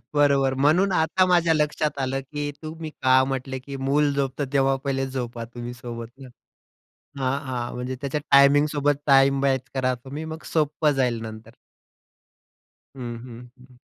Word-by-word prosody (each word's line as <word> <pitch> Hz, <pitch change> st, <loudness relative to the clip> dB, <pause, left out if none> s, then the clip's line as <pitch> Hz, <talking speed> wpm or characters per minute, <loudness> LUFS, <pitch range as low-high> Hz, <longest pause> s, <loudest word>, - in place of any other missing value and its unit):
बरोबर 140 Hz, -2 st, +3 dB
म्हणून 165 Hz, +8 st, +3 dB
आता 180 Hz, +3 st, +2 dB
माझ्या 170 Hz, -2 st, +3 dB
लक्षात 150 Hz, -1 st, 0 dB
आलं, 135 Hz, +1 st, -1 dB
की 145 Hz, +2 st, -5 dB
तुम्ही 155 Hz, 0 st, -6 dB
का 130 Hz, 0 st, +5 dB
म्हटल, 135 Hz, 0 st, -4 dB
की 140 Hz, -1 st, -6 dB
मूल 140 Hz, +2 st, +1 dB
झोपतं 135 Hz, 0 st, -2 dB
तेव्हा 135 Hz, -1 st, +3 dB
पहिले 135 Hz, -1 st, -1 dB
झोपा 120 Hz, -3 st, -5 dB
तुम्ही 120 Hz, 0 st, -6 dB
सोबत. 120 Hz, -1 st, -7 dB
हं, 130 Hz, -, -10 dB, 0.9 s
हां, 135 Hz, +1 st, 0 dB
हां. 125 Hz, -2 st, -4 dB
म्हणजे 125 Hz, +1 st, -4 dB
त्याच्या 140 Hz, +1 st, -2 dB
टायमिंग 140 Hz, +1 st, +6 dB
सोबत 145 Hz, -1 st, +1 dB
टाईम 135 Hz, 0 st, +5 dB
मॅच 135 Hz, -2 st, +2 dB
करा 130 Hz, -1 st, +1 dB
तुम्ही, 135 Hz, +6 st, -8 dB
मग 160 Hz, 0 st, -7 dB
सोपं 155 Hz, -1 st, +2 dB
जाईल 125 Hz, -4 st, 0 dB
नंतर. 110 Hz, 0 st, -9 dB, 1.5 s
हं, 120 Hz, -2 st, -5 dB
हं, 125 Hz, 0 st, -11 dB
हं. 125 Hz, -1 st, -18 dB
135 Hz, 155 wpm, -24 LUFS, 130-145 Hz, 1.5 s, टायमिंग